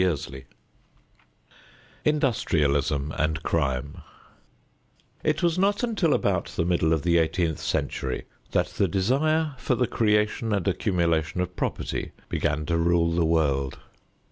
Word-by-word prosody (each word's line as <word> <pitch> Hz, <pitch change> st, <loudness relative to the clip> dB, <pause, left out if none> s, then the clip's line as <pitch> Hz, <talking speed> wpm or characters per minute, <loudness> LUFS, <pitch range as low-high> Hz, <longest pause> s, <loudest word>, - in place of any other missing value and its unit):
XXVIII 70 Hz, -6 st, -2 dB, 1.6 s
INDUSTRIALISM 75 Hz, -, +1 dB
AND 75 Hz, 0 st, 0 dB
CRIME 70 Hz, -2 st, -1 dB, 1.2 s
It -, -, 0 dB
was 170 Hz, +1 st, +2 dB
not 200 Hz, +4 st, +2 dB
until 205 Hz, -10 st, +2 dB
about 90 Hz, -4 st, 0 dB
the 85 Hz, -, -2 dB
middle 85 Hz, -2 st, +2 dB
of 80 Hz, -3 st, +1 dB
the 85 Hz, -1 st, +3 dB
eighteenth 80 Hz, -1 st, 0 dB
century -, -, -2 dB, 0.2 s
that -, -, +1 dB
the 100 Hz, -, 0 dB
desire 145 Hz, -, +1 dB
for 130 Hz, -, 0 dB
the 125 Hz, -, +2 dB
creation 105 Hz, 0 st, +1 dB
and 100 Hz, -3 st, -1 dB
accumulation 85 Hz, -4 st, 0 dB
of 90 Hz, 0 st, -2 dB
property -, -, -3 dB, 0.2 s
began 75 Hz, +1 st, -1 dB
to 85 Hz, +1 st, 0 dB
rule 85 Hz, 0 st, +2 dB
the 85 Hz, 0 st, +1 dB
world. 70 Hz, -5 st, +1 dB
85 Hz, 125 wpm, -26 LUFS, 80-110 Hz, 1.6 s, the